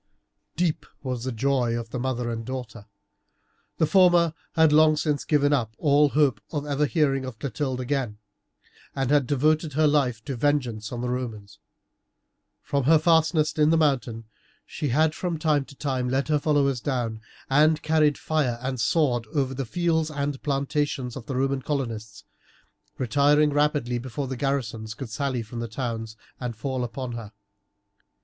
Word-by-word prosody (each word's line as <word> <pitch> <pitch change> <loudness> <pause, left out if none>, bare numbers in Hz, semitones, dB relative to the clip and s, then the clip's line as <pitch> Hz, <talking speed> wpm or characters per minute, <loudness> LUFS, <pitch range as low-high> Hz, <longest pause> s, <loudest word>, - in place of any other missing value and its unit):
Deep 160 -3 -1 0.2
was 125 -2 -3
the 130 - -2
joy 120 -1 0
of 115 -1 -6
the 125 - -3
mother 125 -2 -2
and 115 0 -4
daughter. 120 -3 -7 0.9
The 160 - +3
former 175 -1 +4 0.2
had 160 -3 +4
long 155 0 +5
since 150 -2 0
given 145 -1 +2
up 115 -5 -1
all 145 0 +4
hope 140 -6 +2
of 145 -2 -3
ever 145 0 +1
hearing 140 -4 +1
of 130 -3 -7
Clotilde 130 +2 -3
again, 130 -4 -2 0.8
and 135 -1 -1
had 145 -4 +3
devoted 150 +3 +1
her 155 +2 +3
life 135 -7 +1
to 140 - -3
vengeance 120 -5 -1
on 120 -1 -4
the 125 - -2
Romans. 115 -5 -5 1.0
From 140 -2 -1
her 160 +3 +6
fastness 160 -1 +3
in 150 0 +3
the 165 - +4
mountain 125 -7 0 0.4
she 150 - -4
had 155 +5 +3
from 175 -1 -3
time 150 -3 +1
to 140 - -15
time 130 -3 -2
led 135 +3 0
her 150 -1 +3
followers 140 -4 +1
down, 120 -5 -2 0.3
and 150 +3 +3
carried 155 -2 +3
fire 145 -7 0
and 130 -1 -3
sword 120 -4 +1
over 135 -2 +1
the 135 0 -3
fields 160 +3 0
and 140 -2 -3
plantations 140 -3 -1
of 125 - -8
the 135 - -3
Roman 135 +1 0
colonists, 115 -8 -4 0.7
retiring 145 +4 +3
rapidly 145 -4 +1
before 130 +3 -4
the 130 - -4
garrisons 120 -5 -2
could 115 -1 -7
sally 130 +1 -2
from 115 +2 -8
the 115 - -3
towns 115 -2 -4 0.2
and 125 -2 -4
fall 130 +3 -3
upon 120 +1 -5
her. 115 -2 -7
135 Hz, 165 wpm, -25 LUFS, 120-150 Hz, 1.0 s, her